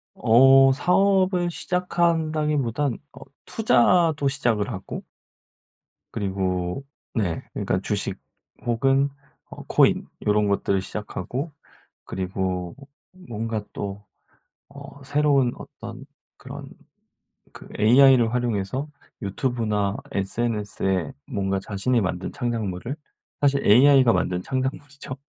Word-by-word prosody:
어 135 Hz, +3 st, +6 dB
사업을 185 Hz, +3 st, +2 dB
시작한다기보단 155 Hz, -8 st, 0 dB, 0.2 s
어 -, -, -13 dB, 0.2 s
투자도 165 Hz, -, +3 dB
시작을 120 Hz, -7 st, 0 dB
하고 95 Hz, -1 st, -6 dB, 1.1 s
그리고 95 Hz, +2 st, -2 dB, 0.3 s
네 95 Hz, -8 st, -1 dB
그러니까 -, -, -1 dB
주식 -, -, -2 dB, 0.5 s
혹은 135 Hz, +4 st, +2 dB, 0.4 s
어 -, -, -10 dB
코인 -, -, +3 dB, 0.2 s
요런 105 Hz, 0 st, +3 dB
것들을 100 Hz, -1 st, +1 dB
시작하고 105 Hz, -, -5 dB, 0.5 s
그리고 95 Hz, -1 st, -3 dB, 0.5 s
뭔가 110 Hz, -1 st, -3 dB
또 100 Hz, 0 st, -5 dB, 0.7 s
어 140 Hz, 0 st, -11 dB
새로운 140 Hz, -2 st, +2 dB
어떤 120 Hz, -1 st, -10 dB, 0.3 s
그런 -, -, -9 dB, 0.9 s
그 -, -, -13 dB
AI를 120 Hz, +1 st, +6 dB
활용해서 120 Hz, +2 st, -1 dB, 0.4 s
유튜브나 105 Hz, -1 st, -1 dB
SNS에 100 Hz, -4 st, -1 dB
뭔가 95 Hz, -1 st, -1 dB
자신이 105 Hz, +6 st, 0 dB
만든 90 Hz, -2 st, -2 dB
창작물을 115 Hz, 0 st, -3 dB, 0.5 s
사실 140 Hz, -1 st, +2 dB
AI가 130 Hz, +2 st, +6 dB
만든 90 Hz, 0 st, -1 dB
창작물이죠. 130 Hz, +1 st, -4 dB
120 Hz, 230 characters per minute, -24 LUFS, 100-140 Hz, 1.1 s, 어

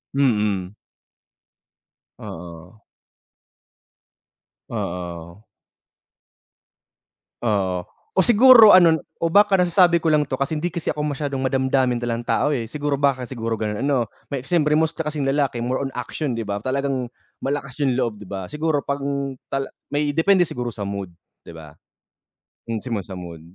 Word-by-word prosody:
Mm. 105 Hz, -8 st, +1 dB, 1.5 s
Oo. 85 Hz, +4 st, -10 dB, 1.9 s
Oo. 85 Hz, +1 st, -6 dB, 2.0 s
Oo, 95 Hz, -5 st, 0 dB, 0.3 s
o 190 Hz, -, +5 dB
siguro 235 Hz, 0 st, +8 dB
ano 170 Hz, -4 st, +6 dB, 0.2 s
o 165 Hz, -, +1 dB
baka 200 Hz, +2 st, +4 dB
nasasabi 175 Hz, -1 st, +4 dB
ko 165 Hz, -, -2 dB
lang 150 Hz, -1 st, +4 dB
to 130 Hz, -2 st, -4 dB
kasi 140 Hz, +3 st, -1 dB
hindi 170 Hz, +3 st, -2 dB
kasi 170 Hz, 0 st, -6 dB
ako 150 Hz, -, -3 dB
masyadong 145 Hz, -2 st, -2 dB
madamdamin 130 Hz, -1 st, +1 dB
talagang 120 Hz, 0 st, -3 dB
tao, 130 Hz, -, +1 dB
eh, 115 Hz, -2 st, -4 dB
siguro 145 Hz, -1 st, -1 dB
baka 135 Hz, -3 st, 0 dB
siguro 115 Hz, -3 st, -3 dB
gano'n 105 Hz, +2 st, -2 dB
ano? 135 Hz, -5 st, +1 dB, 0.2 s
May 135 Hz, -1 st, -4 dB
siyempre 150 Hz, -3 st, +2 dB
mostly 160 Hz, 0 st, -1 dB
kasing 150 Hz, -3 st, -2 dB
lalaki 135 Hz, -3 st, 0 dB
more 125 Hz, +3 st, -1 dB
on 135 Hz, -, -4 dB
action 130 Hz, +3 st, -4 dB
'di 110 Hz, -, -4 dB
ba? 100 Hz, +1 st, -3 dB
Talagang 130 Hz, -2 st, -2 dB, 0.3 s
malakas 140 Hz, -1 st, -3 dB
yung 130 Hz, -2 st, +1 dB
loob 120 Hz, -4 st, -1 dB
di 105 Hz, -, -11 dB
ba? 95 Hz, -2 st, -5 dB
Siguro 150 Hz, -, -1 dB
pang 140 Hz, -1 st, -2 dB, 0.2 s
tal 135 Hz, 0 st, -1 dB, 0.2 s
may 145 Hz, 0 st, 0 dB
depende 180 Hz, +1 st, +4 dB
siguro 125 Hz, -3 st, -4 dB
sa 100 Hz, -2 st, -5 dB
mood, 100 Hz, -2 st, -5 dB, 0.3 s
'di -, -, -11 dB
ba? 80 Hz, -2 st, -12 dB, 0.9 s
Minsan 115 Hz, 0 st, -3 dB
na -, -, -6 dB
sa 95 Hz, -, -8 dB
mood. 85 Hz, -2 st, -8 dB
135 Hz, 145 wpm, -22 LUFS, 110-150 Hz, 2.0 s, siguro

